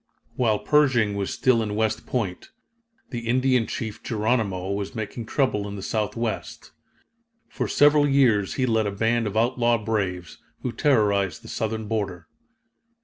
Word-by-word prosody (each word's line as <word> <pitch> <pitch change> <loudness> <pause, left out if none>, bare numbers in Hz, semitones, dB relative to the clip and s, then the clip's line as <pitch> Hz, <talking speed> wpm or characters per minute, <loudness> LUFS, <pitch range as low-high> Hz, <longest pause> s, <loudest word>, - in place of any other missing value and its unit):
While 110 -4 +2
Pershing 130 -7 +3
was 100 -1 -2
still 125 -3 +2
in 105 -2 -3
West 110 0 -1
Point, 100 -8 -3 0.6
the 120 -2 -5
Indian 125 -2 +2
chief 110 -1 -5
Geronimo 105 -4 -1
was 100 +2 -4
making 110 +1 -5
trouble 110 -8 0
in 100 - -6
the 100 - -7
Southwest. 110 +1 -3 0.8
For - - -3
several 145 0 +4
years 120 -8 +3
he 130 - +1
led 110 -3 +1
a - - -1
band 115 +3 0
of 105 +1 -3
outlaw 120 0 +2
braves, 100 -5 -3 0.2
who 125 - -1
terrorized 105 - +1
the - - -11
Southern 110 -1 -3
border. 100 -6 -3
110 Hz, 145 wpm, -24 LUFS, 100-120 Hz, 0.8 s, several